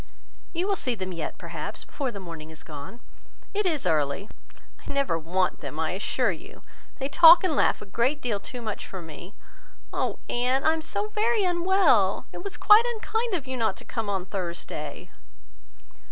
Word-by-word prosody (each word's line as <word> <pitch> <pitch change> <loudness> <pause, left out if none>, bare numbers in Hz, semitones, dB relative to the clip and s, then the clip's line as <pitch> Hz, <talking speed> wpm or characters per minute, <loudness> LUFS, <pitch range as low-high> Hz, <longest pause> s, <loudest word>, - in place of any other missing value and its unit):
"You 355 +2 -1
will 400 - +2
see 250 -9 0
them 185 -3 -5
yet, 165 -3 -5
perhaps, - - -6
before 275 -3 -3
the 205 -4 -7
morning 165 -4 -8
is 160 -1 -8
gone. 150 +9 -9 0.5
It 410 -1 +1
is 310 -6 0
early." 150 +5 0 0.6
"I - - -3
never 275 -10 +1
want 180 +3 0
them, 145 +1 -6
I 160 -1 0
assure 205 +4 0
you. 165 - -10 0.3
They 270 - -2
talk 330 +5 +9
and 350 -5 +1
laugh - - +2
a - - -10
great 240 +9 0
deal 230 -7 -1
too 245 +4 -7
much 215 -2 -4
for 190 - -7
me. 170 +3 -10 0.6
Oh! - - -1
Anne, 250 +2 +1
I 315 - +4
am 320 - -3
so 410 +6 -2
very 435 0 +1
unwell! 345 - +3
It - - -7
was 400 - -5
quite 420 +1 +8
unkind 445 0 -1
of 300 -6 -3
you 260 0 -4
not 230 -3 0
to - - -12
come 225 -4 -3
on 190 -2 -1
Thursday." 170 -6 -5
240 Hz, 185 wpm, -26 LUFS, -, 0.6 s, talk